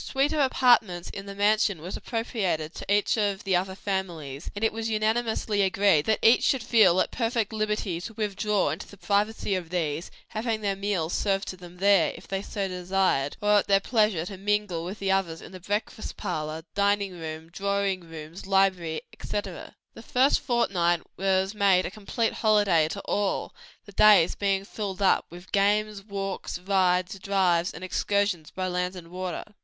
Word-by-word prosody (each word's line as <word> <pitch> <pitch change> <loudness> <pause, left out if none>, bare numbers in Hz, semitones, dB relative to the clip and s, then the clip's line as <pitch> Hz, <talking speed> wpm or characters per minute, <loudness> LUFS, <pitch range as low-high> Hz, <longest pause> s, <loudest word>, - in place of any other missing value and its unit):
A - - -8
suite 275 +3 0
of 310 - 0
apartments 240 -10 +3
in 195 0 -8
the 200 - -7
mansion 205 -2 +2
was 175 +5 -6
appropriated 195 -9 -2
to - - -6
each 205 +2 +2
of 200 -2 0
the 195 -2 +1
other 190 +1 -1
families, 175 -8 -4
and 205 - -4
it 220 - +1
was 225 0 -3
unanimously 220 -1 0
agreed 190 -5 +3
that 220 - +3
each 230 +2 +6
should 265 -4 +2
feel 215 -6 +5
at - - -1
perfect 230 -2 -1
liberty 210 -5 -1
to 225 +4 -7
withdraw 210 -1 0
into - - -6
the 200 - -14
privacy 205 +1 0
of 180 -3 -3
these, 165 -2 -2 0.2
having 220 0 -2
their 200 -2 0
meals 195 -4 -2
served 195 -1 0
to - - -5
them 180 -1 -13
there, 195 -4 +4
if - - -13
they 195 +1 -2
so 200 -1 -3
desired; 180 -6 0
or 210 0 +5
at - - -3
their 195 -1 +5
pleasure 210 -6 +1
to 195 +1 -7
mingle 205 -3 -1
with 185 +4 -6
the 195 -2 -1
others 180 -4 0
in - - -12
the 185 - -9
breakfast 205 +4 -4
parlor, 155 +1 -4
dining 200 -1 +1
room, 160 0 -7
drawing 200 0 -1
rooms, 165 +1 -10
library, 190 -5 +1
etc. 200 -3 -6 0.2
The - - -11
first 255 +4 +3
fortnight 175 -9 +1
was 190 +1 +1
made 195 -3 +3
a - - -4
complete 220 +2 -2
holiday 205 -8 +3
to 200 +5 -5
all, 200 0 -1 0.3
the 200 - -12
days 200 -4 +6
being 195 -1 0
filled 200 -2 -4
up 190 - +3
with 175 +2 -12
games, 205 0 +1
walks, 195 -3 -4
rides, 185 +1 +1
drives 185 -3 +1
and 165 - -10
excursions 200 -3 0
by 185 0 -3
land 180 +1 -2
and 170 -2 -10
water. 180 -1 -4
195 Hz, 180 wpm, -26 LUFS, 180-210 Hz, 0.3 s, each